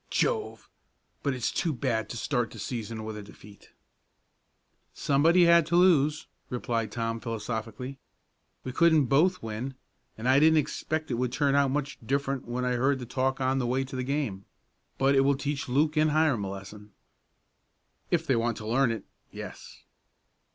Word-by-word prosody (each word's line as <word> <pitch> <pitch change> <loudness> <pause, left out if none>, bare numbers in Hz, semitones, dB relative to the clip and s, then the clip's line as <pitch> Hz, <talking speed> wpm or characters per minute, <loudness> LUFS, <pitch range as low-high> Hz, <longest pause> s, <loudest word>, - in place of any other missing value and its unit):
Jove! 450 -3 -1 0.5
But 140 -3 -1
it's 125 - -1
too 165 - 0
bad 110 -3 -1
to 120 - -5
start 120 -1 -1
the - - -12
season 110 0 -5
with 110 0 -5
a 105 - -6
defeat." 100 0 -15 1.3
"Somebody 165 +6 +4
had 170 -1 +5
to 170 - 0
lose," 155 -5 +4 0.2
replied 115 -2 -2
Tom 115 -1 -2
philosophically. 115 +3 -5 0.6
"We 130 - -4
couldn't 160 +1 +4
both 165 +9 +2
win, 115 +5 -5 0.4
and 110 +3 -4
I 130 +2 +5
didn't 160 +1 +5
expect 155 +1 -2
it 115 - -1
would 125 -1 0
turn 140 +1 +1
out 140 -1 +3
much 140 0 -3
different 135 +1 -1
when 125 +1 -2
I 125 -1 0
heard 135 +3 +2
the 125 - -7
talk 130 +2 -1
on 130 0 +1
the 125 - -1
way 130 +2 +1
to 135 0 -8
the 130 - -2
game. 130 -8 -2 0.5
But 135 +1 +3
it 135 - +5
will 135 0 +3
teach 145 -1 -3
Luke 150 +5 +2
and 155 0 +3
Hiram 150 -8 +2
a - - -4
lesson." 100 +1 -9 1.2
"If 165 -2 +1
they 135 - +2
want 115 -1 0
to 110 - -8
learn 120 +3 +3
it 115 - -5 0.3
yes." - - -10
130 Hz, 175 wpm, -28 LUFS, 115-145 Hz, 1.3 s, had